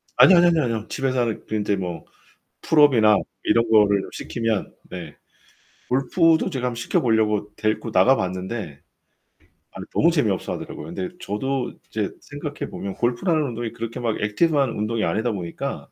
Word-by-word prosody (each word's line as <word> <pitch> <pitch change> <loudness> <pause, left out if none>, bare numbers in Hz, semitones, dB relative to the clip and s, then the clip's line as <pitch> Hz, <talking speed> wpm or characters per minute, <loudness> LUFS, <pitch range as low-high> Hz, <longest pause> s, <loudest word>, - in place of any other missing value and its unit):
아뇨, 190 - +8
아뇨, 175 - +6
아뇨, 165 -4 +3
아뇨. 115 -2 -2
집에서 130 -2 -1
하는 115 -2 -2
그 110 - -3
인제 105 -1 0
뭐 90 -3 -5 0.6
풀업이나 125 -9 +5 0.3
이런 115 0 +2
거를 105 -3 +4
시키면 115 -4 -3 0.2
네 85 -5 -8 0.7
골프도 160 +7 +2
제가 130 -5 -2
한번 125 - -2
시켜 120 - 0
보려고 105 -3 +1
데리고 110 +1 -1
나가 125 +9 +5
봤는데 95 -4 -4 0.9
아니 - - -8
너무 170 - +4
재미없어하더라고요. 105 - -2
근데 95 -1 -3
저도 135 +6 -2 0.2
이제 - - -2
생각해 - - -6
보면 100 -1 -5
골프라는 155 +7 +1
운동이 120 -4 -4
그렇게 115 0 -6
막 115 -3 -1
액티브 145 +10 +1
한 135 -4 +2
운동이 110 +1 -2
아니다 110 +7 0
보니까 85 -4 -4
115 Hz, 365 characters per minute, -23 LUFS, 105-130 Hz, 0.9 s, 아뇨